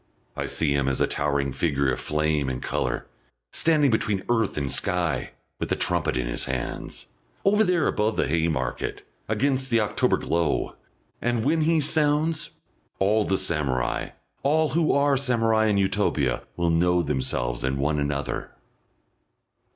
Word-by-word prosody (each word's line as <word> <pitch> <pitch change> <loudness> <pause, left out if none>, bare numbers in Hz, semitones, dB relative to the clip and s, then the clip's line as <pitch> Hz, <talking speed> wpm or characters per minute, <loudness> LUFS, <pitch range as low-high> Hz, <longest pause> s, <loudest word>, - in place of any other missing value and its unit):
I - - -3
see 75 -3 0
him 70 -1 +1
as 70 - 0
a - - +4
towering 70 -2 -1
figure 70 -4 +1
of - - -2
flame 75 -2 0
and 65 - -3
colour, - - -2 0.5
standing 150 -4 +3
between 105 -3 0
earth 115 -7 +1
and 70 -2 -1
sky, 90 -2 0 0.3
with - - -3
a - - +3
trumpet - - 0
in 60 - -1
his - - -2
hands, 65 -1 -4 0.4
over 210 +2 +5
there 180 -5 +2
above 105 +1 0
the - - +2
Haymarket, 80 -5 -1 0.3
against 130 +4 +1
the 115 -1 +3
October 105 - +1
glow; 85 -1 -1 0.5
and 120 -1 0
when 160 +3 +2
he 160 +1 +3
sounds, 150 +1 +1 0.5
all 105 +2 +2
the 95 - +1
samurai, 70 -9 -1 0.3
all 155 +2 +2
who 160 +3 +2
are 140 -1 +3
samurai 115 -4 +2
in 105 -2 +2
Utopia, 95 -10 +1
will 85 -1 +1
know 90 +1 +3
themselves - - -2
and 65 +1 0
one 75 +2 0
another.... 70 0 -3
95 Hz, 150 wpm, -25 LUFS, -, 0.5 s, over